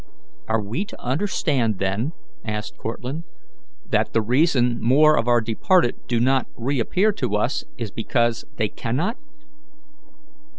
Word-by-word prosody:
"Are 110 -1 +1
we 115 - -2
to 210 - -11
understand, 130 - 0
then," 100 - -1 0.3
asked 105 0 -4
Cortlandt, 125 +8 -5 0.6
"that - - 0
the 115 - +3
reason 125 -1 +2
more 150 +6 +5
of 115 - 0
our 120 -1 +4
departed 120 - +2
do 120 -2 +1
not 130 +2 +2
reappear 140 - +1
to 105 - -2
us 120 +6 0
is 115 -4 -4
because 115 +1 0
they - - +1
cannot?" - - -2
120 Hz, 130 wpm, -23 LUFS, 115-145 Hz, 0.6 s, more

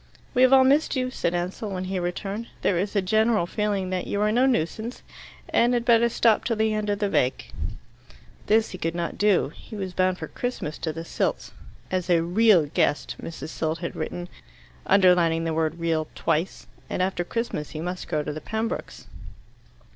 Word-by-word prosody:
"We 250 - +2
have 255 0 +6
all 265 -1 +8
missed 285 +4 +3
you," 255 -1 -1
said 175 -7 -1
Ansell, 180 +5 -3
when 185 -2 -3
he 185 0 -2
returned. 195 +5 -3 0.2
"There 195 - +2
is 200 +3 -2
a 200 - +2
general 215 0 +2
feeling 200 -1 -1
that 185 -1 -2
you 200 - -1
are 210 0 +3
no 250 +4 +4
nuisance, 230 +1 -1 0.5
and 240 +1 +3
had 240 -1 -1
better 235 -1 +5
stop 225 -1 +3
till 230 - 0
the 220 0 +1
end 215 -1 -2
of 205 - +1
the 205 0 0
vac." 130 -9 0 1.0
This 220 +1 +3
he 185 - -7
could 165 0 -2
not 170 -1 -3
do. 205 -8 +3
He - - -11
was 190 -3 -4
bound 185 0 +1
for - - -6
Christmas 245 -11 -4
to 160 - -2
the 165 +2 -7
Silts - - -2 0.4
"as 185 -1 -1
a 170 -2 +4
REAL 185 -1 +4
guest," 145 0 0
Mrs. 160 -2 -7
Silt 160 0 -2
had 170 0 -5
written, 175 0 -4 0.6
underlining 180 -4 +4
the 165 -1 -1
word 160 0 0
"real" 165 -2 0
twice. 165 +3 -1 0.2
And 185 - 0
after 185 -1 -1
Christmas 175 -7 -3
he 155 - -7
must 180 +2 -4
go 150 -1 -1
to 150 - -4
the 155 - -6
Pembrokes. 225 +2 -4
185 Hz, 195 wpm, -25 LUFS, 170-220 Hz, 1.0 s, all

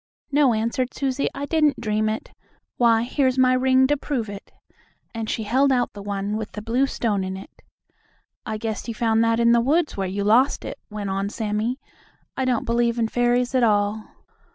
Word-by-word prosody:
"No," 275 -4 +4
answered 235 +3 -2
Susie, 270 0 -1
"I 280 +1 -3
didn't 305 -2 +2
dream 215 -1 0
it. 220 - -5 0.5
Why, 230 -2 +4
here's 260 +1 0
my 255 0 +4
ring 260 +1 +4
to 290 +2 +2
prove 265 -6 -3
it," 200 0 -9 0.6
and 225 -1 -4
she 220 - -2
held 265 +6 +2
out 245 -2 +1
the 205 - -9
one 200 +1 -3
with 220 -1 -6
the 210 - -6
blue 245 +5 +1
stone 210 -7 -1
in 190 0 -4
it. 195 - -13 0.8
"I 220 -1 -4
guess 220 +1 -4
you 230 - -4
found 225 0 +2
that 230 0 +2
in 235 0 +4
the 235 0 +4
woods, 300 +6 +1
where 195 -1 -2
you 200 +2 -3
lost 235 +7 +3
it," - - -6
went 205 -2 -4
on 195 +1 -1
Sammie. 220 +4 -2 0.6
"I 265 - -1
don't 250 -3 0
believe 235 0 +1
in 225 -1 0
fairies 245 +1 +1
at 255 - +3
all." 210 -1 +1
230 Hz, 200 wpm, -23 LUFS, 215-255 Hz, 0.8 s, No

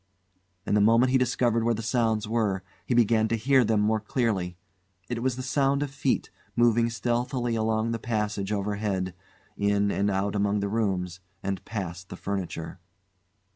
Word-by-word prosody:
And - - +1
the 105 - +4
moment 115 +4 +5
he 130 - +4
discovered 120 -2 +1
where 115 0 +2
the 115 - -5
sounds 115 -2 +1
were, 105 -4 0 0.2
he 125 - +1
began 115 -1 +4
to 115 - 0
hear 130 +3 +4
them 110 -2 +2
more 110 +1 +2
clearly. 105 -6 -1 0.5
It 120 -1 -2
was 130 0 0
the 130 - -5
sound 140 +1 +1
of 145 - -5
feet, 140 - -1 0.2
moving 115 0 +4
stealthily 120 +1 -1
along 110 0 0
the 115 - -2
passage 105 -3 -2
overhead, 100 -2 -1 0.4
in 100 0 +2
and 100 +1 +1
out 100 +1 0
among 100 0 +1
the 100 0 -1
rooms, 95 -5 -1 0.2
and 95 -1 -3
past 95 -4 -5
the - - -6
furniture. 95 -4 -4
110 Hz, 170 wpm, -27 LUFS, 100-120 Hz, 0.5 s, moment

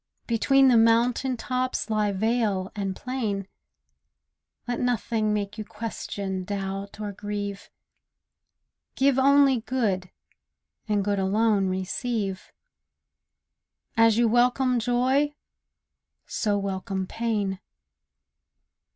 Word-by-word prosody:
Between 270 +4 +4
the 245 -2 +6
mountain 235 +3 +3
tops 255 +1 -2
lie 215 -2 +1
vale 205 -2 0
and 195 -2 -2
plain; 215 -7 -3 1.2
Let 245 0 -2
nothing 225 -3 0
make 205 0 -2
you - - -2
question, 200 -3 -5
doubt, 195 +1 -5
or 210 -1 -3
grieve; 205 0 -5 1.3
Give 270 0 +3
only 275 -1 +5
good, 205 -8 -1 0.8
and 205 -2 +1
good 205 -1 0
alone 200 +1 +2
receive; 190 +1 -3 1.4
And 225 0 +6
as 225 -1 +2
you 235 0 +4
welcome 245 +2 +3
joy, 260 +5 +1 0.9
so 205 -2 0
welcome 195 -1 -3
pain. 210 -3 -2
215 Hz, 100 wpm, -26 LUFS, 200-245 Hz, 1.4 s, the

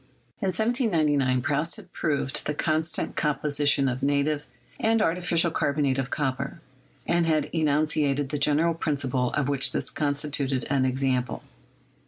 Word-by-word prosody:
In 195 - 0
1799, 165 - +1
Proust 150 +4 +1
had 190 -5 -13
proved 140 -3 0
the 150 - -1
constant 160 +1 -1
composition 145 -2 +1
of 130 0 -2
native 145 +1 0 0.3
and 225 +1 +2
artificial 170 -3 +1
carbonate 140 -3 0
of 135 -1 -2
copper, 135 -2 -2 0.5
and 170 -1 +2
had 155 -2 +1
enunciated 150 -3 +1
the 150 - -2
general 150 +3 +2
principle 140 -6 -1
of 145 -3 0
which 140 -1 +1
this - - -3
constituted 140 -3 -1
an 135 -2 +2
example. 130 -1 -1
145 Hz, 135 wpm, -26 LUFS, 135-160 Hz, 0.5 s, and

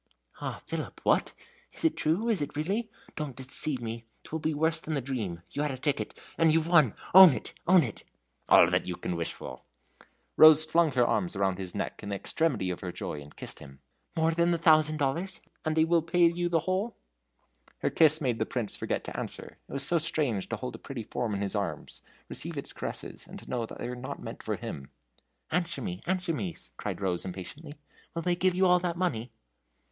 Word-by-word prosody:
"Ah, - - -5
Philip - - -5
what? - - +3 0.4
is - - -2
it 325 - +3
true? 175 +9 0
is 220 -8 +1
it 145 - -4
really? 200 +10 -1 0.3
Don't 150 -5 -4
deceive 135 +2 0
me! 115 0 -5 0.2
'twill 160 - -5
be 155 0 0
worse 160 +2 +1
than 155 -1 -3
the - - +1
dream. 110 -10 -4
You 145 - -2
had 150 - 0
a 135 - -4
ticket! 130 -6 -1 0.2
and 165 -1 +5
you've 160 0 +2
won! 155 - +5 0.2
own 185 -4 +11
it! - - -6
own 180 -1 +7
it!" 115 -6 -5 0.5
"All - - +8
you 90 - -1
can 90 - -3
wish 85 -1 -2
for." - - -9 0.8
Rose 155 0 +9
flung 160 -1 +3
her 125 -1 +4
arms 175 +7 0
around 95 -1 0
his 95 -2 -6
neck - - -3
in 105 - -6
the 100 - -1
extremity 120 - 0
of 90 - -5
her 90 - -5
joy, 75 -3 -5
and 70 0 -14
kissed - - -6
him. 70 0 -13 0.4
"More 160 0 +2
than 170 +1 +2
the 170 - +2
thousand 155 -2 +4
dollars? 165 +6 -1 0.2
and 155 0 -1
will 170 0 +4
they 165 +1 -16
pay 175 -1 +5
you 175 +1 +1
the 165 -2 +2
whole?" 190 +7 -1 0.9
Her - - +1
kiss 155 -1 +5
made 125 -6 -1
the 110 - +1
Prince 120 -6 -3
forget - - -2
to - - -7
answer. - - -6
It - - -9
was 140 0 +1
so 170 +4 +3
strange 145 - -1
to 115 - -1
hold 125 +3 -5
a - - -9
pretty 130 -5 -6
form 110 0 -2
in 100 - -3
his 100 -1 -2
arms, - - -4 0.3
receive - - -3
its - - -5
caresses, - - -6
and - - -9
to - - -13
know 120 -2 -2
they 120 - -6
were 125 - -4
not 125 +1 -6
meant - - -8
for - - -2
him. 70 -2 -7 0.6
"Answer 170 -3 0
me, 90 -1 -4
answer 180 -2 0
me!" 95 - -3 0.2
cried - - -5
Rose, 90 -3 0
impatiently. 140 - -8 0.4
"Will 165 - -2
they 175 +1 +2
give 185 0 +2
you 190 +1 +3
all 180 -1 +5
that 175 -1 -2
money?" 125 -11 -1
150 Hz, 215 wpm, -29 LUFS, 115-170 Hz, 0.9 s, own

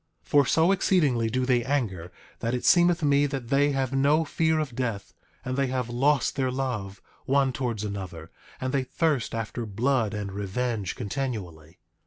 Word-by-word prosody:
9:5 - - -31
For 145 -1 +5
so 165 +3 +4
exceedingly 150 - +2
do 130 +2 0
they 125 -2 +2
anger 105 -11 -2 0.3
that 115 +1 -1
it 125 - -4
seemeth 175 -1 +4
me 145 0 +3
that 135 -4 -5
they 145 +1 +3
have 135 -1 -1
no 145 +4 +3
fear 160 +1 +1
of 150 -5 -2
death; 115 -5 -3 0.3
and 130 0 -2
they 135 0 +1
have 125 -2 -2
lost 135 +2 +2
their 130 -2 0
love, 125 -7 -4 0.2
one 135 -1 +2
towards 120 -5 -2
another; 95 -6 -6 0.3
and 130 0 -3
they 135 -2 +1
thirst 140 -3 -1
after 115 +1 -4
blood 115 +1 0
and 100 -2 -4
revenge 100 +1 -2
continually. 95 - -5
130 Hz, 175 wpm, -26 LUFS, 110-140 Hz, 0.3 s, For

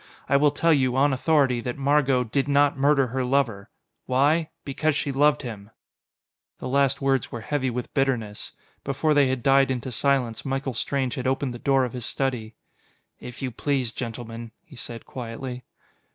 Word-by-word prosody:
I 140 - +2
will 145 +1 +5
tell 165 +3 +2
you, 130 -3 +2
on 140 +1 +3
authority, 130 -3 +2
that 125 +2 -4
Margot 140 -2 +2
did 135 +4 -1
not 145 0 +3
murder 140 0 +3
her 130 +1 -2
lover. 125 -6 0 0.4
Why? 145 +5 +2 0.2
Because 145 +2 0
she 145 - -1
loved 145 +2 +3
him!" 105 -4 -7 0.9
The - - -6
last 140 +1 +1
words 135 -2 +1
were 120 - -5
heavy 130 +2 -1
with 125 0 -5
bitterness. 125 -7 -1 0.3
Before 145 +3 +1
they 145 -2 +4
had 130 -2 -2
died 135 0 +4
into 130 -1 -3
silence, 125 -2 0
Michael 135 -1 -2
Strange 130 +2 -1
had 130 -1 -3
opened 130 -1 0
the 120 - -8
door 135 0 +2
of 125 - -6
his 125 -2 -4
study. 125 -5 -2 0.6
"If 125 +2 -9
you 130 - -2
please, 130 -1 -1
gentlemen," 115 0 -6
he 150 - -16
said 120 -1 -7
quietly. 125 +1 -7
130 Hz, 175 wpm, -25 LUFS, 125-140 Hz, 0.9 s, will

